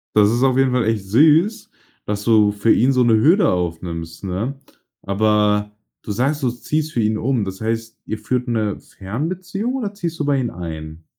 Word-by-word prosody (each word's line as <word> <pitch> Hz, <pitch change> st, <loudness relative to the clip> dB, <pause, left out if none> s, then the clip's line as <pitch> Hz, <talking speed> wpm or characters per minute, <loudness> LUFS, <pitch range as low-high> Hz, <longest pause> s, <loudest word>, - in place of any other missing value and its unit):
Das 105 Hz, 0 st, +5 dB
ist 120 Hz, +2 st, +1 dB
auf 130 Hz, -1 st, +3 dB
jeden 135 Hz, -1 st, +3 dB
Fall 125 Hz, -3 st, +1 dB
echt 110 Hz, -3 st, 0 dB
süß, 155 Hz, -, +3 dB, 0.4 s
dass 105 Hz, 0 st, -3 dB
du 105 Hz, -3 st, +4 dB
für 105 Hz, +2 st, +2 dB
ihn 130 Hz, +3 st, +4 dB
so 130 Hz, -1 st, +3 dB
'ne 115 Hz, -2 st, +4 dB
Hürde 165 Hz, -, +4 dB
aufnimmst, 85 Hz, -1 st, -4 dB
ne? 105 Hz, +9 st, -3 dB, 0.4 s
Aber, 105 Hz, 0 st, +1 dB, 0.3 s
du 105 Hz, -, -4 dB
sagst, 140 Hz, +7 st, 0 dB
du 130 Hz, -, +1 dB
ziehst 155 Hz, +5 st, -3 dB
für 120 Hz, -, +1 dB
ihn 110 Hz, 0 st, +1 dB
um. 120 Hz, 0 st, 0 dB
Das 95 Hz, -1 st, -6 dB
heißt, 115 Hz, 0 st, -3 dB
ihr 110 Hz, -, -4 dB
führt 125 Hz, +3 st, -2 dB
'ne 110 Hz, -3 st, -1 dB
Fernbeziehung 180 Hz, -, -4 dB
oder 215 Hz, -6 st, -3 dB
ziehst 170 Hz, -5 st, -4 dB
du 150 Hz, -, -2 dB
bei 140 Hz, -1 st, +2 dB
ihm 120 Hz, -3 st, -2 dB
ein? 80 Hz, -2 st, -8 dB
115 Hz, 195 wpm, -20 LUFS, 105-135 Hz, 0.4 s, Das